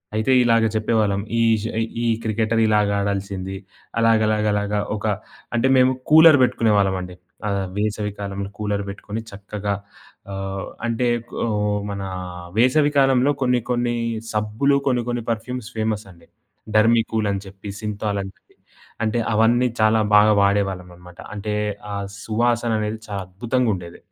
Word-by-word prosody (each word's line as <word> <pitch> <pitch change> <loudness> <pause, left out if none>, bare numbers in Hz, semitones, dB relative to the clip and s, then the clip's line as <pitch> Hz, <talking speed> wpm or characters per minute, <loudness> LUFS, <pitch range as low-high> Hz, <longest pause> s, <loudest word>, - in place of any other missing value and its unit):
అయితే 110 +4 +1
ఇలాగ 115 -1 +4
చెప్పేవాళ్ళం, 110 -2 +1 0.2
ఈజు 110 -1 +2
ఆహ్, 115 - 0 0.2
ఈ - - +2 0.2
క్రికెటరిలాగ 110 -1 +2
ఆడాల్సింది, 100 -1 -3 0.4
అలాగలాగలాగ 105 -2 +2 0.3
ఒక 105 - -6 0.5
అంటే, 125 +3 +2
మేము 130 0 +5 0.2
కూలర్ 160 -2 +8
బెట్టుకునే 115 -3 +2
వాళ్ళమండి. 95 -2 0 0.3
ఆహ్, 100 -1 -1
వేసవి 105 -1 -1
కాలంలో 100 0 -4
కూలర్ 100 -1 -1
బెట్టుకొని, 105 +3 -6
చక్కగా 100 0 -4 0.6
ఆహ్, 95 0 -4 0.2
అంటే 120 +1 0 0.4
ఓహ్, 105 -1 0
మనా 95 -1 -4 0.5
వేసవి 145 +4 +4
కాలంలో, 135 +1 +4
కొన్ని 125 -1 +2
కొన్ని 120 -1 0 0.4
సబ్బులు, 110 +7 +1
కొన్ని 125 -2 +2
కొన్ని 120 -1 -2
పర్ఫ్యూమ్స్ 115 +1 -4
ఫేమసండి. 105 -5 -4 0.5
డర్మికూలని 110 -2 +2
చెప్పి, 95 +1 -10
సింథాలని 105 -2 -3
చెప్పి. - - -34 0.6
అంటే, 110 +1 0
అవన్నీ 115 +3 +3
చాలా 110 0 +4
బాగా 105 +1 +7
వాడేవాళ్ళం 100 -2 +1
అనమాట. 90 0 -15
అంటే, 105 0 -4 0.4
ఆ - - -2 0.3
సువాసననేది 110 -1 0
చాలా 100 -2 -4
అద్భుతంగుండేది. 100 -3 -2
110 Hz, 120 wpm, -22 LUFS, 100-115 Hz, 0.6 s, కూలర్